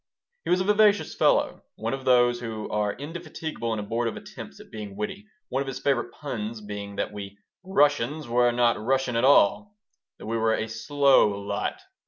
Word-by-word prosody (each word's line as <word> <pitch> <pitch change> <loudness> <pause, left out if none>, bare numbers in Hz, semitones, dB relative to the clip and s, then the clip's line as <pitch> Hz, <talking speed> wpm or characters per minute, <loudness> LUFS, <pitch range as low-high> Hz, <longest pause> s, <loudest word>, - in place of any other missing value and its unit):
He - - -4
was 180 - +3
a - - +1
vivacious 210 +1 +3
fellow, - - +2
one - - -3
of 135 -1 -5
those 120 -1 +4
who 110 -3 -5
are 105 -1 0
indefatigable 155 -4 -5
in 110 - -1
abortive 115 +3 -2
attempts - - -10
at - - -15
being 105 -3 -7
witty, 195 - -5 0.2
one 135 +2 -1
of 140 - -4
his 135 -1 -4
favorite 130 -3 0
puns 115 -6 -5
being 105 -1 -7
that - - -3
we 100 -1 -8 0.3
"Russians 145 -5 +1
were 120 +1 +3
not 120 -2 +2
rushin' 130 0 0
at 115 - +1
all," 145 - +4 0.4
that - - -11
we 115 +2 -1
were 110 0 +2
a 110 - -3
"slow 140 +4 +3
lot." 100 - -3
120 Hz, 185 wpm, -26 LUFS, 110-145 Hz, 0.4 s, those